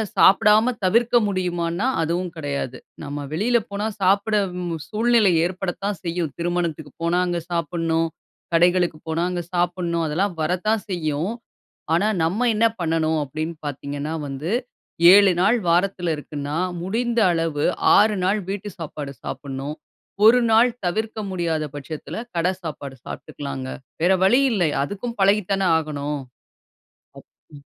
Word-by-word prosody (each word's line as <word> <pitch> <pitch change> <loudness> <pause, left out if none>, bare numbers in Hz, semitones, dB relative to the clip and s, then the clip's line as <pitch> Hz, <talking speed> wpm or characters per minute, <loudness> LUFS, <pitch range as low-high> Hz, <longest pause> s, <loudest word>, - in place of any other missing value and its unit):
சாப்பிடாம 210 +5 +5
தவிர்க்க 235 +5 +3
முடியுமான்னா, 180 0 -1 0.2
அதுவும் 175 +2 -2
கிடையாது. 140 -4 -3 0.3
நம்ப 145 0 -5
வெளியில 225 +9 +2
போனா 200 +1 -2 0.2
சாப்பிட 200 +3 +3 0.3
ம் 165 -3 -4
சூழ்நிலை 225 -2 +3
ஏற்படத்தான் 190 +1 -3
செய்யும். 170 -4 -2
திருமணத்துக்கு 170 -4 -2
போனா 170 +1 +2
அங்க 175 -1 -1
சாப்பிடணும். 165 -1 0 0.4
கடைகளுக்கு 175 -1 +3
போனா 165 +1 0
அங்க 175 -1 -2
சாப்பிடணும். 175 -1 0
அதெல்லாம் 180 +6 0
வரத்தான் 185 +6 0
செய்யும். 160 0 -1 0.6
ஆனா, 185 +6 +3
நம்ப 180 +9 0
என்ன 215 +2 +2 0.2
பண்ணணும் 160 -1 +1
அப்டீன்னு 155 +4 -4
பாத்தீங்கன்னா 145 +2 -4
வந்து, 140 +4 -4 0.6
7 195 +2 +5
வாரத்துல 175 0 +1
இருக்குன்னா, 145 0 -5 0.3
முடிந்த 235 +5 0
அளவு 165 -3 -1 0.3
6 205 -1 +3
வீட்டு 205 +1 -4
சாப்பாடு 150 -3 -6
சாப்பிடணும். 140 +1 -5 0.5
1 235 0 +5 0.2
தவிர்க்க 220 +4 -2
முடியாத 165 -4 -1
பட்சத்துல 150 +9 -6
கட 170 +1 +2
சாப்பாடு 140 -4 -6
சாப்பிட்டுக்கலாங்க. 135 -2 -6 0.3
வேற 180 +3 +4
வழி 240 +8 +5
இல்லை, 175 -8 +2
அதுக்கும் 215 +8 -5
பழகி 200 +2 +4
தானே 195 -1 +2
ஆகணும். 150 -2 -3 1.0
அப் - - -14 0.3
ம். 140 - -13
175 Hz, 120 wpm, -22 LUFS, 155-200 Hz, 1.0 s, சாப்பிடாம